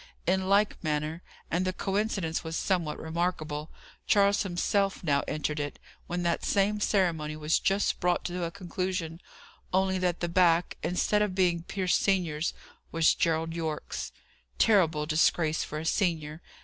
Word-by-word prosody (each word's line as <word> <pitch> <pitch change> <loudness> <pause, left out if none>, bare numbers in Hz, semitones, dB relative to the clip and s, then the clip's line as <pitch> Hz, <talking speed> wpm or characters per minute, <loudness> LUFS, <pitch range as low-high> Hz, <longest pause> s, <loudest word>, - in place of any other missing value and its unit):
In 185 +2 +1
like 205 0 +2
manner 155 +1 -2 0.3
and 175 +3 +1
the 185 - 0
coincidence 195 -4 -1
was 160 0 -4
somewhat 170 -6 0
remarkable 160 -2 -3 0.4
Charles 200 0 +4
himself 195 +2 0
now 145 -4 +2
entered 150 0 -2
it, 145 0 -4 0.3
when 175 0 -2
that 170 -1 0
same 205 +1 +2
ceremony 170 -7 +1
was 155 +1 +1
just 195 +1 +1
brought 180 0 +1
to 180 0 -3
a 170 - -1
conclusion, 180 -2 -4 0.5
only 190 0 +2
that 180 -1 0
the 175 - -1
back, 170 0 +3
instead 210 +4 +1
of 205 -3 0
being 175 -3 +2
Pierce 185 +1 0
senior's, 170 -5 0 0.4
was 165 -1 +4
Gerald 165 -1 0
Yorke's. 160 -2 -4 0.5
Terrible 170 -9 +3
disgrace 160 +1 +2
for 150 - -6
a 155 - -5
senior! 160 -3 0
175 Hz, 150 wpm, -28 LUFS, 160-190 Hz, 0.5 s, Charles